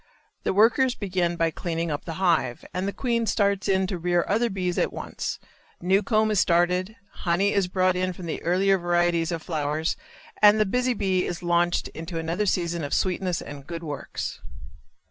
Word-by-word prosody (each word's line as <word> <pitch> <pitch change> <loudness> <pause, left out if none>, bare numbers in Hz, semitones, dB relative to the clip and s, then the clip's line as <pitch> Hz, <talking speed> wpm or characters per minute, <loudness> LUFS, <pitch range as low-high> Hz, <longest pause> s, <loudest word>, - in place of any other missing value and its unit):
The - - 0
workers 240 +5 +4
begin 180 -4 -1
by 165 -1 +1
cleaning 165 0 -3
up 145 - -4
the 165 - -4
hive, 165 -9 +1
and 185 +2 -2
the - - -1
queen 235 0 -1
starts 200 -1 +1
in 190 -1 +2
to 185 -1 -4
rear 175 0 +1
other 230 +4 +1
bees 185 -3 -2
at - - +1
once; - - -5 0.4
new 190 +3 +3
comb 215 +1 +2
is 210 - +2
started, 180 +4 +2 0.3
honey 185 +3 +2
is 200 -3 +2
brought 185 0 +2
in 185 0 0
from 180 0 -9
the 165 - -4
earlier 190 +3 +2
varieties 175 -1 +1
of 165 -2 -4
flowers 155 0 -1 0.5
and 210 0 +7
the 215 - +4
busy 250 +4 0
bee 190 -3 +1
is 175 0 -5
launched 175 0 +1
into 165 +1 -7
another 165 +6 -1
season 170 -3 0
of 145 - -1
sweetness 185 -1 -1
and 140 -1 -10
good 170 -1 -6
works. 150 -3 -5
180 Hz, 185 wpm, -25 LUFS, 170-195 Hz, 0.5 s, and